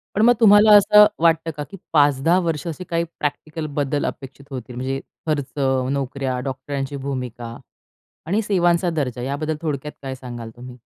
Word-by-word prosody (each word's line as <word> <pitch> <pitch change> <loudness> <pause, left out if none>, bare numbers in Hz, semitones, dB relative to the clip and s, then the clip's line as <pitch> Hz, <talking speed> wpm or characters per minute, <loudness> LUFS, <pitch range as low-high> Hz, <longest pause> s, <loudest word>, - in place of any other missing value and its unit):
पण 205 - +2
मग 240 +2 +6
तुम्हाला 210 -1 +7
असं 210 +1 +7 0.2
वाटतं 165 0 +3
का 150 - -3
की 195 - -10 0.2
5-10 145 +3 +4
वर्ष 165 -4 -2
असे 165 +2 -5
काही 170 0 0 0.2
प्रॅक्टिकल 155 +2 -3
बदल 145 0 0
अपेक्षित 135 +1 -7
होतील, 125 -2 -7
म्हणजे 130 +2 -3 0.3
खर्च, 145 -5 -2 0.4
नोकऱ्या, 135 -1 -2
डॉक्टरांची 135 +1 -4
भूमिका 125 -4 -5 0.7
आणि 200 +7 +1
सेवांचा 175 -3 +2
दर्जा 130 -7 -3
याबद्दल 145 +4 -2
थोडक्यात 150 -1 -3
काय 135 -1 -5
सांगाल 120 -3 -8
तुम्ही? 125 +1 -11
145 Hz, 155 wpm, -21 LUFS, 130-165 Hz, 0.7 s, तुम्हाला